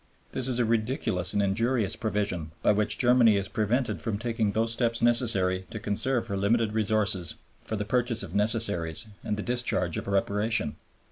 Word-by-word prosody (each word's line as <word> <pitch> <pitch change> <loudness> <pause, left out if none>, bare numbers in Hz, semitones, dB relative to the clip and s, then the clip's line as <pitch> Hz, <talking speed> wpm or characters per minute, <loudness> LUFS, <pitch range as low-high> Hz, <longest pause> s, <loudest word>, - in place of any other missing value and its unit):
This 130 -1 +2
is 125 -2 0
a 120 - +2
ridiculous 110 -5 0
and 100 - +1
injurious 110 +2 0
provision, 100 -7 -2
by - - +4
which 105 0 +2
Germany 120 -4 +4
is 100 0 -2
prevented 115 +5 -1
from 110 -3 -2
taking 115 -2 -1
those 115 +1 +1
steps 115 -1 0
necessary 100 -6 +2
to 110 - -6
conserve 115 +5 -1
her 100 - -4
limited 105 +2 +1
resources 105 -5 0 0.3
for 110 - -4
the 105 -1 -3
purchase 120 -1 0
of 90 -3 -8
necessaries 105 -3 +1 0.2
and 105 - -2
the 105 - -4
discharge 120 -8 -1
of - - -5
Reparation. 100 -2 +1
110 Hz, 175 wpm, -27 LUFS, 100-115 Hz, 0.3 s, by